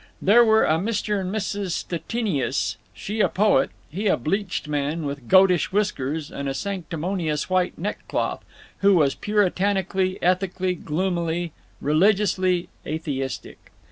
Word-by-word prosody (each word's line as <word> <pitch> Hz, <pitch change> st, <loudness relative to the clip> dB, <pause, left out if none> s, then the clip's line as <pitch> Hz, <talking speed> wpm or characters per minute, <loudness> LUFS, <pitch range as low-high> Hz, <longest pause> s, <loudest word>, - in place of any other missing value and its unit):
There 230 Hz, +5 st, +6 dB
were 220 Hz, -1 st, +4 dB
a 160 Hz, +1 st, +2 dB
Mr. 210 Hz, 0 st, -1 dB
and 185 Hz, 0 st, -3 dB
Mrs. 200 Hz, -3 st, -2 dB
Stettinius—she 200 Hz, -, -3 dB
a -, -, +4 dB
poet; 210 Hz, +2 st, +3 dB, 0.2 s
he 200 Hz, +7 st, -3 dB
a -, -, +3 dB
bleached 185 Hz, -, -2 dB
man, 150 Hz, +2 st, -2 dB
with 140 Hz, -4 st, -5 dB
goatish 185 Hz, -2 st, +5 dB
whiskers 160 Hz, -7 st, -1 dB
and 140 Hz, 0 st, -4 dB
a 135 Hz, -, -3 dB
sanctimonious 175 Hz, -3 st, -3 dB
white 185 Hz, -1 st, +1 dB
neck 205 Hz, +5 st, -4 dB
cloth, -, -, -2 dB, 0.4 s
who 200 Hz, 0 st, +5 dB
was 145 Hz, -5 st, +3 dB
Puritanically, 190 Hz, -2 st, 0 dB
ethically, 185 Hz, +1 st, +1 dB
gloomily, 170 Hz, 0 st, -2 dB, 0.3 s
religiously 185 Hz, +2 st, +2 dB, 0.2 s
atheistic. 145 Hz, -4 st, -5 dB
185 Hz, 125 wpm, -24 LUFS, 160-200 Hz, 0.4 s, There